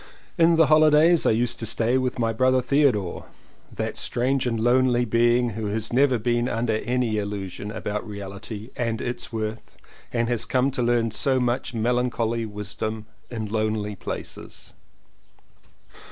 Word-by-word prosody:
In 170 -1 +4
the 160 0 +5
holidays 155 +2 +5
I - - +5
used 115 +2 0
to 115 - -2
stay 115 +2 +1
with 130 0 0
my 115 -2 0
brother 130 +3 +3
Theodore, 125 - +1 0.5
that - - -4
strange 130 +2 0
and 115 -2 -1
lonely 125 +1 +3
being, 120 +1 +2
who 110 -1 -4
has 110 +2 -3
never 130 0 +4
been 120 +2 0
under 115 -1 0
any 120 -2 -1
illusion 100 -1 -5
about 105 0 -4
reality 105 +3 -7
and 115 -2 -2
its 120 0 -4
worth 110 0 -5 0.3
and 115 -1 0
has 120 -2 0
come 130 +1 +1
to 130 - -2
learn 120 -1 +1
so 130 +5 +2
much 125 0 -1
melancholy 115 -1 0
wisdom 105 +1 -5 0.2
in 115 -3 -4
lonely 110 -1 -2
places. - - -8
120 Hz, 150 wpm, -24 LUFS, 110-125 Hz, 0.5 s, the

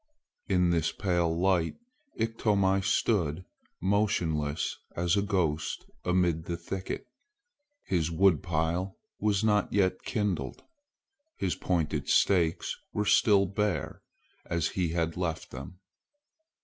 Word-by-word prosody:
In 90 -2 +3
this 80 -2 +1
pale 90 -4 0
light 85 0 +1 0.4
Iktomi 105 -4 +2
stood 90 -4 +1 0.3
motionless 85 -7 0 0.2
as 85 +2 +1
a 100 - +2
ghost 90 -7 -1 0.2
amid 90 -3 +1
the 85 0 -3
thicket. 95 +3 -5 0.8
His 85 -4 0
woodpile 85 +1 +1 0.2
was 105 -1 +1
not 105 -2 +2
yet 95 -2 +2
kindled. 95 - -2 0.7
His 90 - 0
pointed 80 -5 -1
stakes 85 -5 +2 0.2
were 105 - -1
still 100 -2 +5
bare 105 +2 -2 0.5
as 85 -1 0
he 90 -3 -1
had 85 0 -1
left 85 -3 -3
them. 70 +7 -8
90 Hz, 110 wpm, -29 LUFS, 80-100 Hz, 0.8 s, still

